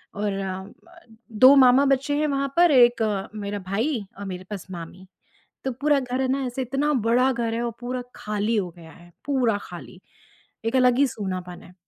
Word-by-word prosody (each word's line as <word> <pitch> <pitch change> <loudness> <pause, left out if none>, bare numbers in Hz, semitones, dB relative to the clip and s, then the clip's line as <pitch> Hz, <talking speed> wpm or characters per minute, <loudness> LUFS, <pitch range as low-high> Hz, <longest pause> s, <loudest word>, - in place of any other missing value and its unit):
और 205 0 -2
अ, 190 -1 -4
म 200 - -14 0.7
2 260 +2 +9
मामा 260 0 +6
बचे 275 +2 -1
हैं 305 +1 +1
वहाँ 275 -1 -2
पर, 345 -1 +6
एक 240 -3 +5 0.3
मेरा 205 -1 -4
भाई 225 +4 -1
और 200 - -6
मेरे 185 -1 -7
बस 195 -2 -7
मामी। 175 +2 -9 0.6
तो 265 - -1
पूरा 285 +4 +1
घर 255 0 -3
है 260 - 0
ना, 270 +1 0
ऐसे 250 +2 -3
इतना 275 +4 -1 0.2
बड़ा 250 +3 +3
घर 230 -2 -2
है 235 - -2
और 240 - -1
पूरा 250 +1 -4
ख़ाली 210 +2 -2
हो 195 -4 0
गया 160 -1 -13
है, 175 0 -17 0.2
पूरा 250 -7 +1
ख़ाली, - - -11 0.6
एक 225 +3 0
अलग 250 -1 +4
ही 280 - +5
सुनापना 185 -5 -6
है। 180 - -17
240 Hz, 195 wpm, -24 LUFS, 200-265 Hz, 0.7 s, 2